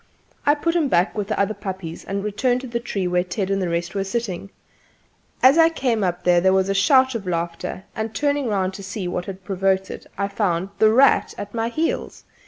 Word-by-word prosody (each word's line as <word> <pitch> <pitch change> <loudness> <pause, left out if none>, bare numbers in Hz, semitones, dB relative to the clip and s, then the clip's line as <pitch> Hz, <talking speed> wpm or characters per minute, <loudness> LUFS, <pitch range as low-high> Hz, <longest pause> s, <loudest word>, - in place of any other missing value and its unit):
I 290 - +6
put 335 +3 -1
him 325 -4 +2
back 180 -5 +2
with 205 -2 -2
the - - -2
other 200 +2 +1
puppies 190 -5 -6
and 200 0 -3
returned 245 +4 0
to 260 - -7
the 235 0 -2
tree 205 -6 -3
where 180 0 +1
Ted 185 +2 -3
and 195 0 0
the 180 - -1
rest 170 +1 -2
were 195 -1 -1
sitting. 195 -2 -4 0.9
As 270 +5 +7
I 325 0 +7
came 250 -9 0
up 180 -1 -1
there 180 +1 +4
was 190 0 +2
a - - +2
shout 260 +6 +4
of 215 -5 -5
laughter, 170 +1 -3
and 220 0 -3
turning 285 +1 0
round 190 -3 0
to 195 - -8
see 195 -1 -4
what 180 0 -3
had 190 -1 -8
provoked 190 0 0
it - - -9
I 200 0 0
found 195 -3 -1
"The 220 - +6
Rat" 260 +5 +4
at 205 - -7
my 230 0 -1
heels. 315 +7 -2
200 Hz, 220 wpm, -22 LUFS, 185-235 Hz, 0.9 s, As